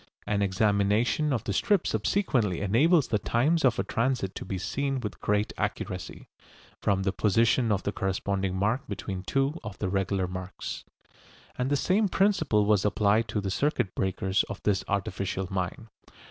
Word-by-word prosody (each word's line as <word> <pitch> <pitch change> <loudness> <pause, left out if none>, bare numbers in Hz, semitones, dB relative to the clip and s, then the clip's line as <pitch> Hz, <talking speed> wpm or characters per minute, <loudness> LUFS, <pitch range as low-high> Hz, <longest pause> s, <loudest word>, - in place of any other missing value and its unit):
An 100 -1 0
examination 105 +8 +2
of 120 -6 0
the 100 - -2
strip 205 - +2
subsequently 125 - 0
enables 140 - +3
the 105 - +1
times 150 +11 +1
of 125 -3 +3
a - - +1
transit 115 -5 -1
to - - -6
be 95 -1 -4
seen 135 +8 -2
with 105 -4 -6
great 105 0 0
accuracy, - - -4 0.5
from 95 -1 +1
the 95 - +1
position 110 +4 +2
of 100 -2 0
the 100 - -1
corresponding 95 -1 -1
mark 110 +7 +1
between 95 -2 -5
two 135 - 0
of 105 -2 -7
the 95 - -2
regular 95 0 0
marks. 90 0 -6 0.7
And 125 +1 -1
the 145 - +2
same 195 +8 +2
principle 175 - +2
was 105 -2 +3
applied 105 +2 +2
to 105 0 -2
the 95 -1 -3
circuit 125 -5 0
breakers 95 +1 0
of 100 - -5
this 100 -2 +1
artificial 95 -1 -2
mine. 95 +4 -3
105 Hz, 165 wpm, -28 LUFS, 95-130 Hz, 0.7 s, enables